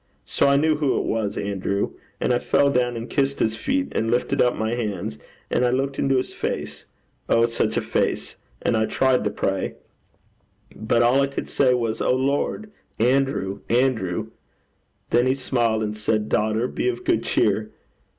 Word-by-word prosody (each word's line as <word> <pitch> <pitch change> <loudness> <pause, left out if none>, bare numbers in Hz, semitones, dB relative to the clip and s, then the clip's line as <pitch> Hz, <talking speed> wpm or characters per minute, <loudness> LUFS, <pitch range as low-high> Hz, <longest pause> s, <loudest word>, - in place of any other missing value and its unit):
So - - +1
I 140 0 +5
knew 155 +1 +2
who 150 -3 +1
it - - 0
was, 110 -3 -2
Andrew. 100 0 -1 0.3
And - - +1
I 120 - +2
fell 140 +3 +2
down 125 -2 +1
and 115 +1 -5
kissed 140 -1 0
his 110 0 0
feet, 275 - -1
and 115 - -1
lifted 120 +2 +1
up 125 - +3
my 110 +1 -1
hands, 100 -11 -3 0.3
and 125 - +2
looked 135 +1 -2
into 135 -1 +2
his 130 - -2
face - - -4 0.4
oh, 115 0 +4
such 115 0 -1
a - - +2
face! - - -1 0.3
And - - +2
I 110 0 +1
tried 130 -1 +2
to - - +2
pray. - - -2 1.0
But 110 +2 +1
all 125 +4 +4
I 140 - +2
could 140 - -5
say 130 -2 +3
was, 115 -2 -2
"O 125 - +2
Lord, 140 +11 -1 0.3
Andrew, 125 -5 +1
Andrew!" 115 -8 0 0.8
Then 120 +2 +3
he 130 - +2
smiled, 120 -4 0
and 105 0 -3
said, 105 0 -1
"Daughter, 110 +3 +1
be 380 - -1
of 370 0 -4
good - - +2
cheer. - - +1
120 Hz, 180 wpm, -23 LUFS, 110-135 Hz, 1.0 s, I